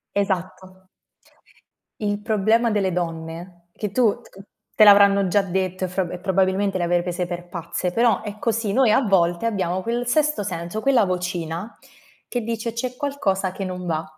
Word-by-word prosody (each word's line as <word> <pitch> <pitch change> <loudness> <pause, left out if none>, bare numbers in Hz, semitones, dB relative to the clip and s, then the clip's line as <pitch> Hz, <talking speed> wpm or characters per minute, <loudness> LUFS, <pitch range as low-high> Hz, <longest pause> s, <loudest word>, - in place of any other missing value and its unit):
Esatto. 185 -1 -3 1.1
Il 205 -1 -2
problema 220 +2 +2
delle 200 -3 +1
donne, 170 0 -5
che 210 +2 -5
tu 235 0 +2 0.6
te 215 - +6
l'avranno 200 -1 +7
già 205 +3 +3
detto 185 0 -2
e - - -3
fro 185 -1 -2
e 180 - -6
probabilmente 190 +1 +1
le 180 - -1
avrei 175 0 +2
prese 180 0 -3
per 175 0 -6
pazze, 175 0 -4
però 230 0 +2
è 210 -1 -7
così, 225 -2 -1
noi 255 -2 +4
a 215 - +5
volte 175 -4 +2
abbiamo 190 -4 -1
quel 235 +3 -2
sesto 300 -2 +1
senso, 180 +2 -4
quella 260 -6 +3
vocina 180 +1 -4 0.5
che 245 - -2
dice: 230 0 -3
"C'è 250 +2 -4
qualcosa 195 -10 -1
che 195 - -5
non 180 -1 -5
va." 160 -2 -1
195 Hz, 165 wpm, -22 LUFS, 180-220 Hz, 1.1 s, l'avranno